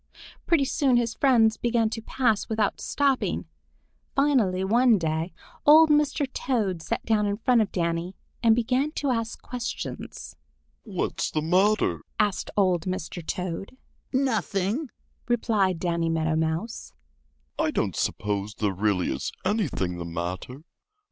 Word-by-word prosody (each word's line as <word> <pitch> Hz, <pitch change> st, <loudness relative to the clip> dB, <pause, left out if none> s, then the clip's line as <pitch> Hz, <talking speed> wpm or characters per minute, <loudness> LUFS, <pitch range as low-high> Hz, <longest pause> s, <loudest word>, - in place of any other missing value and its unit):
Pretty 320 Hz, -5 st, +3 dB
soon 270 Hz, -3 st, +2 dB
his 235 Hz, -1 st, 0 dB
friends 225 Hz, -5 st, +4 dB
began 235 Hz, -2 st, +1 dB
to 225 Hz, -, -4 dB
pass 225 Hz, -2 st, 0 dB
without 220 Hz, -2 st, 0 dB
stopping. 280 Hz, -2 st, 0 dB, 0.7 s
Finally 245 Hz, -10 st, +2 dB
one 235 Hz, +3 st, +4 dB
day 160 Hz, 0 st, -2 dB, 0.3 s
old 310 Hz, +1 st, +7 dB
Mr. 295 Hz, -1 st, +2 dB
Toad 205 Hz, -10 st, -1 dB
sat -, -, -3 dB
down 215 Hz, -2 st, +2 dB
in 200 Hz, 0 st, -1 dB
front 235 Hz, +1 st, +3 dB
of 210 Hz, -, -1 dB
Danny 170 Hz, +1 st, -2 dB, 0.3 s
and 225 Hz, -2 st, +5 dB
began 255 Hz, +5 st, +1 dB
to 285 Hz, -5 st, -1 dB
ask 230 Hz, -1 st, -2 dB
questions. 245 Hz, -2 st, -6 dB, 0.5 s
"What's 195 Hz, -6 st, -2 dB
the 155 Hz, -, -2 dB
matter?" 190 Hz, +6 st, +2 dB, 0.2 s
asked 205 Hz, -2 st, 0 dB
old 185 Hz, -4 st, +2 dB
Mr. 180 Hz, -1 st, -4 dB
Toad. 185 Hz, +8 st, -4 dB, 0.3 s
"Nothing," 240 Hz, -, 0 dB, 0.4 s
replied 215 Hz, -6 st, +1 dB
Danny 170 Hz, -1 st, 0 dB
Meadow 160 Hz, -1 st, 0 dB
Mouse. 160 Hz, +8 st, -2 dB
220 Hz, 110 wpm, -26 LUFS, 185-250 Hz, 0.7 s, old